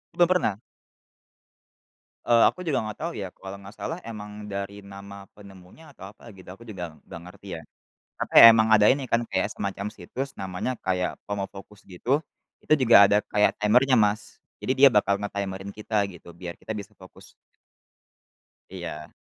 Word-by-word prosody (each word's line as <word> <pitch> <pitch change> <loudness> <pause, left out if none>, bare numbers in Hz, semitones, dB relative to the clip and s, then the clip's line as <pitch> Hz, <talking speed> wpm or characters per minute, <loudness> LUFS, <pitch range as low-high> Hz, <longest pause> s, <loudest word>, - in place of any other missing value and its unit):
Belum 175 - +4
pernah? 170 - +1 1.7
Eee, 120 -1 +4
aku - - -12
juga 150 -5 0
enggak 110 -1 -7
tahu 170 - -2
ya. 95 - -4
Kalau 95 0 -9
enggak 100 +1 -13
salah 165 - -4
emang 105 -1 -8
dari 100 +1 -5
nama 100 0 -12
penemunya 100 - -15
atau 95 - -11
apa 105 - -24
gitu 95 -1 -15
aku 115 - -16
juga 90 -7 -7
enggak 85 - -10
ngerti 100 +2 -16
ya. - - -12 0.6
Apa - - -4
ya, - - +11
emang 110 0 +3
ada 105 -1 +6
ini 135 0 -1
kan 115 - +3
kayak - - -1
semacam 100 +1 -4
situs 135 +5 -6
namanya 95 +5 -3
kayak 90 -1 -2
Pomofocus 100 0 -7
gitu, 125 - -2 0.4
itu - - +2
juga 120 -3 +5
ada 105 - +3
kayak 105 0 +3
timer-nya 125 +5 +4
Mas, 105 +1 -1 0.2
jadi - - 0
dia 135 +2 +7
bakal 100 -1 +2
nge-timer-in 100 -1 -5
kita 105 -1 -1
gitu, 85 -2 -13
biar 85 0 -8
kita - - -9
bisa 100 - -11
fokus. - - -17 1.4
Iya. 85 -5 -8
100 Hz, 165 wpm, -25 LUFS, 95-110 Hz, 1.7 s, ya